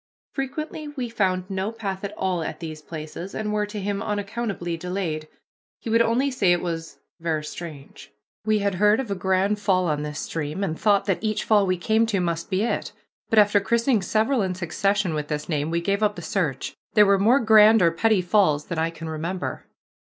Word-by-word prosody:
Frequently 300 +3 -4
we 265 -5 -4
found 185 -5 0
no 195 +2 -2
path 200 -4 -5
at 200 - -3
all 185 -3 0
at - - -5
these 155 -2 -7
places, 160 +4 -7
and 210 -1 -2
were 210 0 0
to 210 0 -6
him 200 0 -2
unaccountably 205 -4 -3
delayed. 165 -3 -3 0.5
He 225 - -5
would 230 +1 +5
only 240 +5 +2
say 200 -8 +2
it 175 - 0
was 165 -2 -4 0.2
"ver' 160 -2 -1
strange." 150 -3 -9 0.3
We 215 0 +2
had 200 -1 0
heard 210 +2 +5
of 250 -6 -3
a - - +2
Grand 190 +2 +1
Fall 190 -3 +2
on 150 -3 0
this 150 0 -5
stream, 160 +4 -3
and 160 -5 -2
thought 205 -2 +3
that 195 +1 -1
each 215 -1 0
fall 205 -3 +3
we 185 0 +1
came 220 +5 +2
to 205 -4 0
must 170 -2 -2
be 190 +1 +1
it, 235 - -2 0.4
but 225 - +1
after 205 -1 +6
christening 235 +2 +2
several 220 +6 +1
in 185 -2 -1
succession 190 +1 0
with 150 -1 -3
this 150 -1 -3
name 150 -2 -1
we 170 +1 0
gave 200 +4 0
up 210 -1 +2
the - - -8
search. - - -2 0.2
There 210 -1 +7
were 200 -1 +4
more 235 +7 +5
Grand 220 -2 +6
or 170 - +5
Petty 205 +2 +2
Falls 175 -6 +2
than 170 -2 -3
I 165 +1 +1
can 165 0 -8
remember. 165 +4 -4
195 Hz, 210 wpm, -24 LUFS, 170-215 Hz, 0.5 s, There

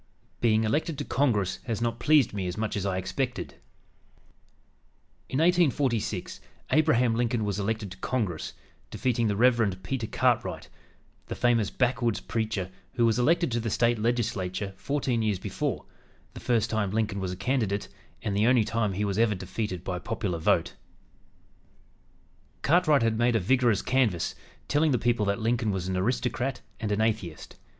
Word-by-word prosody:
"BEING 110 -2 +3
ELECTED 150 +7 0
TO - - -4
CONGRESS 105 -9 +1
HAS 115 -4 -2
NOT 115 0 -1
PLEASED 150 -7 +4
ME 95 -3 -2
AS 90 - -4
MUCH 110 0 -2
AS 100 -1 -1
I 95 -1 -1
EXPECTED" 125 +7 -3 1.8
In 130 - -2
1846 140 - +1 0.3
Abraham 125 -7 +3
Lincoln 115 -1 0
was 100 0 -2
elected 105 -1 -2
to 95 - -9
Congress, 100 -7 -2 0.4
defeating 120 -3 0
the 105 - 0
Rev. 115 -4 +3
Peter 115 +2 -3
Cartwright, - - 0 0.6
the - - -4
famous 115 -4 +2
backwoods 120 -3 0
preacher, 110 -5 -3 0.2
who 120 -2 +2
was 115 +1 +2
elected 165 +4 +2
to 120 - 0
the 115 0 -2
State 115 +1 +2
Legislature 105 -4 -1
fourteen 130 +2 -1
years 105 -3 +1
before, - - -3 0.5
the - - -8
first 120 -3 +1
time 110 -3 0
Lincoln 105 -1 -1
was 95 -1 -3
a - - -4
candidate 110 -5 -1 0.4
and 105 -3 -1
the 105 +3 +3
only 125 -2 +5
time 110 -2 -1
he 105 +3 -1
was 100 +1 -1
ever 115 -2 +3
defeated 95 0 -4
by 90 -2 -3
popular 95 -4 -3
vote. 80 - +2 1.9
Cartwright 155 -4 +4
had 115 -1 +1
made 120 0 +3
a - - +4
vigorous 120 +1 +2
canvass, 125 -10 +1 0.3
telling 150 0 +2
the - - +3
people 115 -3 +1
that 100 +3 0
Lincoln 115 0 0
was 95 -2 -2
"an 95 - -1
aristocrat 125 +5 -1 0.2
and 110 -2 -2
an 105 +1 +1
atheist." 105 -8 -2
115 Hz, 160 wpm, -27 LUFS, 100-125 Hz, 1.9 s, only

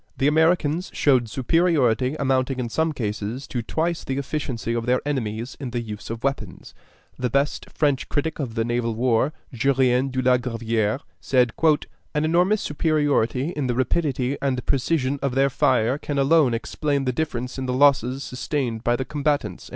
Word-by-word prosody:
The 135 - +2
Americans 160 +2 +2
showed 125 -5 +3
superiority 130 -2 +2
amounting 135 -2 0
in 120 -2 -2
some 160 +6 0
cases 110 0 -4
to 120 - -3
twice 165 +8 -2
the 135 - -3
efficiency 130 -5 -3
of 115 0 -2
their 125 0 +3
enemies 120 -3 -3
in 135 -3 -4
the 120 0 -2
use 105 -3 -7
of 115 0 -5
weapons. 140 0 -4 0.5
The 125 0 0
best 140 +4 0
French 145 -4 0
critic 160 +2 -2
of 125 -6 -4
the 115 -1 0
naval 120 -1 -1
war, 120 +3 +2 0.2
Jurien 130 +1 +2
de 130 0 -3
la 125 0 +5
Gravière, 115 -1 -1 0.2
said: 125 -3 +2 0.6
"An 150 +1 +1
enormous 180 +6 +2
superiority 145 -3 +1
in 145 -6 -2
the 120 - 0
rapidity 130 0 0
and 130 -3 -1
precision 140 0 0
of 135 -2 -1
their 135 +1 +3
fire 125 +2 +2
can 145 -1 -4
alone 140 -3 +4
explain 140 +4 -2
the 125 - 0
difference 125 -3 -3
in 130 - -3
the - - 0
losses 135 -1 +3
sustained 125 -3 -3
by 120 0 +2
the 130 - -3
combatants." 145 - -2
130 Hz, 170 wpm, -23 LUFS, 120-145 Hz, 0.6 s, la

